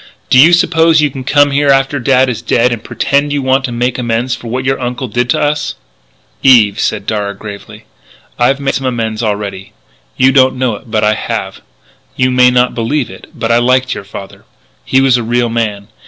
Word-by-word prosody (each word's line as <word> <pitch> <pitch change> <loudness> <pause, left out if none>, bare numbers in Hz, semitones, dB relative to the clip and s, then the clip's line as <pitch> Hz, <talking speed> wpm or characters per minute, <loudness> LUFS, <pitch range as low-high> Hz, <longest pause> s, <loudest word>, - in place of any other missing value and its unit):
Do 130 - +6
you 160 +6 +7
suppose 165 -2 +3
you 150 -2 +1
can 130 0 -7
come 145 +2 +3
here 140 +1 +1
after 135 +1 +2
Dad 130 +1 +2
is 115 -3 -3
dead 120 0 +1
and 115 - -7
pretend 140 +1 -1
you 145 -1 -1
want 130 +1 +1
to 125 - -5
make 120 +2 -2
amends 120 +1 -1
for 120 - -11
what 130 +3 -3
your 135 0 0
uncle 125 +1 -4
did 120 +2 -2
to - - +1
us?" 150 0 -1 0.7
"Eve," 115 -6 +4
said - - -2
Darragh 100 -2 -3
gravely, 100 -2 -10 0.6
"I've 135 +3 +2
made 140 -1 -1
some 135 0 -2
amends 115 -3 -3
already. 100 -3 -4 0.4
You 130 +1 +4
don't 130 -1 +3
know 125 -2 0
it, 115 +3 -13
but 110 -1 0
I 105 0 +3
have.... - - -5 0.5
You 130 0 +1
may 125 0 +5
not 125 0 +1
believe 120 +1 -2
it, 95 - -13
but 115 - -2
I 115 - +4
liked 130 +1 +1
your - - -7
father. 100 0 -11 0.4
He 130 - +2
was 135 -2 +3
a 120 - -3
real 120 +1 0
man. 105 -3 -3
125 Hz, 210 wpm, -13 LUFS, 115-135 Hz, 0.7 s, you